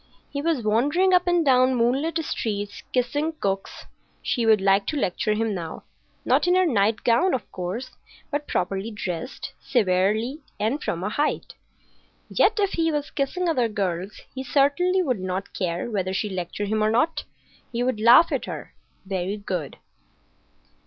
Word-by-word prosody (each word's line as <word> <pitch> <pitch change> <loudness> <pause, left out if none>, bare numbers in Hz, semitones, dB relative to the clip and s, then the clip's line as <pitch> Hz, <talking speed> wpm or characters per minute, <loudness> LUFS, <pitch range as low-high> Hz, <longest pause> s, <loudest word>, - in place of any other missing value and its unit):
He 280 - -3
was 310 -6 0
wandering 290 - +2
up 360 0 +4
and 350 -2 +3
down 255 -1 +4
moonlit 265 +8 +1
streets, 205 -5 -3
kissing 290 +6 0
cooks. 195 -9 -3 0.4
She 235 -3 0
would 220 -2 +6
like 195 +1 +3
to 305 - -1
lecture 215 -3 0
him 220 0 0
now,—not 170 - -3
in 355 - +4
her 370 0 +4
nightgown, 230 - +2
of 250 - -6
course, 185 +8 -4 0.4
but 290 0 -2
properly 195 +4 -1
dressed, 205 +2 -5
severely 215 +5 +1 0.2
and 230 +8 -1
from 170 +1 -2
a 205 - -1
height. 290 +7 -1 0.8
Yet - - +3
if 400 -1 +2
he 325 -1 +1
was 295 -1 -2
kissing 300 +6 -1
other 255 -8 +2
girls 195 -2 -3
he 265 - -5
certainly 295 +8 +2
would 255 - 0
not 185 +1 -4
care 175 +1 -2
whether 190 -2 -1
she 210 - -1
lectured 190 +2 -4
him 215 0 +1
or 215 - +3
not. 245 +9 +1 0.5
He 240 0 -1
would 250 -3 0
laugh 245 +9 +7
at - - -1
her. - - -7 0.3
Very 190 +1 -2
good. 180 -8 -4
230 Hz, 160 wpm, -24 LUFS, 195-290 Hz, 0.8 s, laugh